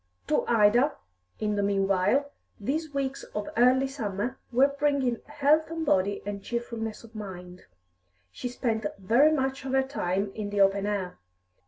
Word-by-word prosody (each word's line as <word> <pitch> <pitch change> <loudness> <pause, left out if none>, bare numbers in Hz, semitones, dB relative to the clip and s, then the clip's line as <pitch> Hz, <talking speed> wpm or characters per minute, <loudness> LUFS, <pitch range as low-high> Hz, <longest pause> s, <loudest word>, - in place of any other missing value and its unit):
To - - +2
Ida, 235 +5 +4 0.4
in 210 -1 0
the - - +2
meanwhile, 200 +7 +2 0.3
these 300 +9 -2
weeks 275 -1 -2
of 210 -1 -2
early 255 +3 +5
summer 240 -2 -4
were 275 +3 +3
bringing 275 -5 +1
health 295 +2 +2
of 325 -1 -3
body 200 -5 +1
and 205 -1 -4
cheerfulness 230 -1 -4
of 230 -1 -15
mind. 180 -4 -9 0.7
She 245 - -5
spent 225 -4 -1
very 235 +11 +4
much 270 -3 -1
of 265 -1 -4
her 265 0 +4
time 195 -7 -2
in 210 -2 -4
the 205 0 -2
open 195 +1 +3
air. 195 - -3
230 Hz, 155 wpm, -27 LUFS, 200-270 Hz, 0.7 s, early